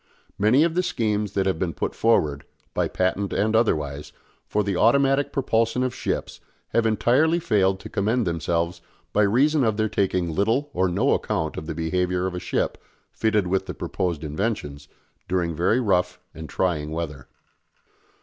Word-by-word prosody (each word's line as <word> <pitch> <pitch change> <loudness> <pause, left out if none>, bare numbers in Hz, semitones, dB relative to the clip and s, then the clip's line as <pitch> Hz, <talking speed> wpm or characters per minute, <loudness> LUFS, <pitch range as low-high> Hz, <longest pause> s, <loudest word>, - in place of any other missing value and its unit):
Many 115 +9 +5
of 165 -1 +1
the 180 - +2
schemes 105 - -1
that 95 -1 +1
have 95 -4 0
been 90 -3 -2
put - - -2
forward, 75 -11 +2 0.3
by - - +1
patent 95 +2 -1
and 110 +2 +1
otherwise, 75 -10 0 0.4
for 105 - 0
the 100 -1 -1
automatic 135 +6 +3
propulsion 115 -2 +1
of 130 -1 -1
ships - - -3 0.3
have 115 -1 +2
entirely 130 +9 +3
failed 95 - +2
to - - -8
commend 110 +4 0
themselves 85 +1 -1 0.3
by 105 - +3
reason 135 +8 +3
of 110 -3 +1
their 110 0 +1
taking 90 -5 0
little 115 - 0
or 95 +1 +1
no 90 - +2
account 80 -1 -1
of 75 - -6
the 80 - -4
behaviour 90 +2 0
of 95 - -2
a 90 - -3
ship, 90 - -2 0.3
fitted 105 -3 +1
with 95 +1 -1
the - - -5
proposed 85 -4 -3
inventions, 75 -4 -3 0.4
during 90 -2 0
very 90 +9 +2
rough 90 -6 +1
and 80 -1 -9
trying 80 -5 -1
weather. 75 -5 -5
95 Hz, 170 wpm, -24 LUFS, 85-115 Hz, 0.4 s, Many